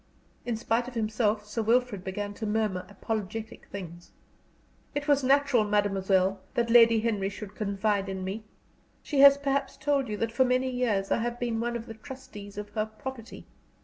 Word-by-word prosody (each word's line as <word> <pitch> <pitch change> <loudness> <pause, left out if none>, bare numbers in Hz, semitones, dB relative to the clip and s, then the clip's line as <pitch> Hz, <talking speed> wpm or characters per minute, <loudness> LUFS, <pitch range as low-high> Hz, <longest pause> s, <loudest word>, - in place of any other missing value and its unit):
In 235 -2 0
spite 230 +2 0
of 250 - -9
himself, 215 -1 0
Sir 210 +2 -3
Wilfrid 230 -3 +1
began 205 +2 -4
to 215 +1 -5
murmur 210 -4 -1
apologetic 220 +1 -5
things. 175 -3 -8 0.9
"It 290 +1 -2
was 285 -2 +3
natural, 275 -3 +4
mademoiselle, 195 -2 +1 0.2
that 235 -1 +1
Lady 230 -2 +7
Henry 210 -4 0
should 205 0 -8
confide 200 -1 -1
in 190 -1 -4
me. 195 +4 -4 0.6
She 290 - -1
has 280 0 +9
perhaps 280 -1 -1
told 285 -2 +1
you 210 - -3
that 230 +2 -1
for 260 +3 +3
many 255 +1 +1
years 225 -6 0
I - - +3
have 240 +1 -2
been 235 -2 -1
one 240 +1 -1
of 230 -1 -4
the 225 - -8
trustees 225 -4 -10
of 210 0 -5
her 215 +1 -2
property. 230 +2 -8
220 Hz, 180 wpm, -28 LUFS, 205-245 Hz, 0.9 s, has